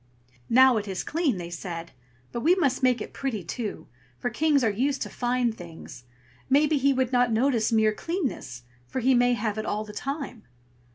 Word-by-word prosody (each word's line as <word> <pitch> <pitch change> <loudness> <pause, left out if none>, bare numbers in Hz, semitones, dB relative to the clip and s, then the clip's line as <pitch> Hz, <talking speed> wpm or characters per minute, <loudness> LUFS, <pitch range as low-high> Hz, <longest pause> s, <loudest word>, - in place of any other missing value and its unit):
"Now 260 0 +6
it 210 -1 -3
is 190 -2 -3
clean!" 300 - 0
they 175 -1 -6
said; 170 -1 -6 0.4
"but 235 - -3
we 330 +9 +4
must 280 -9 +1
make 250 -3 +3
it - - -7
pretty, 240 -8 -3
too, 210 +5 -5 0.3
for 245 - -3
kings 295 +1 +2
are 225 - +3
used 270 +7 0
to - - -8
fine 245 -1 0
things; 165 - -11 0.4
maybe 295 +2 +4
he 275 +1 +3
would 260 -2 0
not 245 -1 +3
notice 230 -1 +2
mere 220 -1 +3
cleanness, 250 - -4 0.2
for 260 - -3
he 260 +2 +3
may 245 0 +4
have 215 -2 -2
it 215 - -3
all 210 +1 -1
the 210 - -10
time." 275 0 -5
245 Hz, 190 wpm, -26 LUFS, 210-270 Hz, 0.4 s, Now